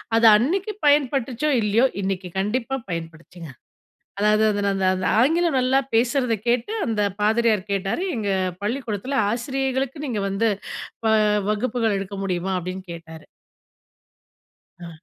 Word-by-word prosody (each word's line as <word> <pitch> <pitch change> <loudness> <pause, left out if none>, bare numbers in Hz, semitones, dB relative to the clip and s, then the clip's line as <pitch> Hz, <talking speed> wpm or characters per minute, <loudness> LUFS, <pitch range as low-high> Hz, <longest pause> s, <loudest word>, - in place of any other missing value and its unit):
அது 230 - +4
அன்னிக்கு 370 - 0
பயன்பட்டுச்சோ 275 -1 +2
இல்லையோ, 215 +4 +3 0.2
இன்னைக்கு 190 -1 -3
கண்டிப்பா 245 +6 -1
பயன்படுச்சுங்க. 165 0 -7 0.7
அதாவது 210 +1 +3 0.3
அந்த 190 -1 0
அந்த 185 -1 -2
ஆங்கிலம் 325 +1 +2
நல்லா 265 +2 +3
பேசுறத 240 +1 +2
கேட்டு 240 - +1
அந்த 220 -2 -1 0.2
பாதிரியார் 220 -1 +2
கேட்டாரு 195 - -1
"எங்க 205 -3 -2 0.3
பள்ளிக்கூடத்துல 240 +2 -3
ஆசிரியைகளுக்கு 265 +3 -2
நீங்க 225 -5 -2
வந்து, 215 +3 +1 0.6
ப - - +3 0.4
வகுப்புகள் 225 -1 0
எடுக்க 195 0 -6
முடியுமா?" 185 0 -2
அப்டின்னு 185 +2 -6
கேட்டாரு. 160 -1 -11 1.6
ஆ. - - -7
225 Hz, 115 wpm, -23 LUFS, 195-265 Hz, 1.6 s, அது